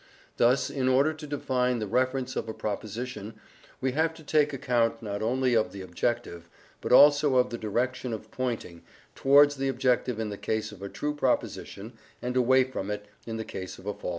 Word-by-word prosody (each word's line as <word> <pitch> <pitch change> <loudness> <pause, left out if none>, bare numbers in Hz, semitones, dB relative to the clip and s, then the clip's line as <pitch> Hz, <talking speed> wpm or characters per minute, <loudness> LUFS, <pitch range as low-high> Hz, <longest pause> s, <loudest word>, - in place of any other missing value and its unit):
Thus, 125 +3 +3
in 130 -2 -1
order 140 +5 +3
to 155 -1 -9
define 125 -3 0
the 110 - -2
reference 130 +3 0
of 115 - -3
a 110 - -5
proposition 110 +1 -5 0.4
we 130 0 0
have 160 +4 0
to 160 - -13
take 150 0 +2
account 120 -3 0
not 100 -1 -4
only 125 +3 +1
of 110 - +2
the 100 - -8
objective, 90 -2 -3 0.3
but - - -4
also 145 +1 +7
of 125 -1 +3
the 120 - -3
direction 125 +4 -2
of 110 -1 -6
pointing, 115 -10 -4 0.3
towards 145 +1 +5
the 135 0 -1
objective 125 -2 +1
in 110 -1 -2
the 100 - -7
case 110 0 -2
of 95 - -13
a 100 - -5
true 150 +7 -3
proposition 125 -5 -2 0.3
and 125 +2 -4
away 130 +1 +5
from 125 -6 -5
it 105 0 -4 0.2
in 115 -1 -4
the 110 - -4
case 95 -1 -7
of - - -14
a 105 - -2
false - - -21
one. - - -2
125 Hz, 205 wpm, -28 LUFS, 110-130 Hz, 0.4 s, also